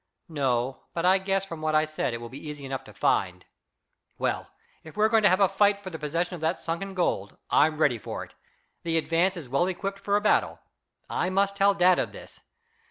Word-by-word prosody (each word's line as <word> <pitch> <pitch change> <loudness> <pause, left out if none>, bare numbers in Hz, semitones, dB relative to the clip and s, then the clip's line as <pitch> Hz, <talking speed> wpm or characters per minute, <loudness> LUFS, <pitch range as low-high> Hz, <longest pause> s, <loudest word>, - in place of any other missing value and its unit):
"No; 130 -4 -1
but 170 0 -1
I 190 +1 +5
guess 195 0 -1
from 165 -4 -8
what 155 0 0
I 155 0 +4
said 155 -4 -2
it 115 - -3
will 120 0 -8
be 130 +4 -9
easy 145 -2 -7
enough 135 0 -4
to - - -12
find. - - 0 0.7
Well, - - -1 0.4
if 160 +5 -13
we're 215 +1 +4
going 225 0 +4
to 205 - +6
have 185 +2 +3
a 195 - +6
fight 200 +1 +3
for 190 -2 -8
the 160 - -6
possession 165 +4 -2
of 175 - -7
that 160 +3 0
sunken 190 +4 -4
gold, 105 - -1
I'm 155 +1 +4
ready 140 -7 +2
for - - -5
it. - - -14 0.5
The 165 -1 0
Advance 170 +4 +1
is 155 -6 -7
well 140 +8 +1
equipped 195 +2 -4
for 200 0 0
a 205 - +2
battle. 210 - +2 0.5
I 180 - -1
must 200 +1 +1
tell 200 0 +4
dad 180 -1 +4
of - - -2
this. - - -12
175 Hz, 225 wpm, -27 LUFS, 155-195 Hz, 0.7 s, to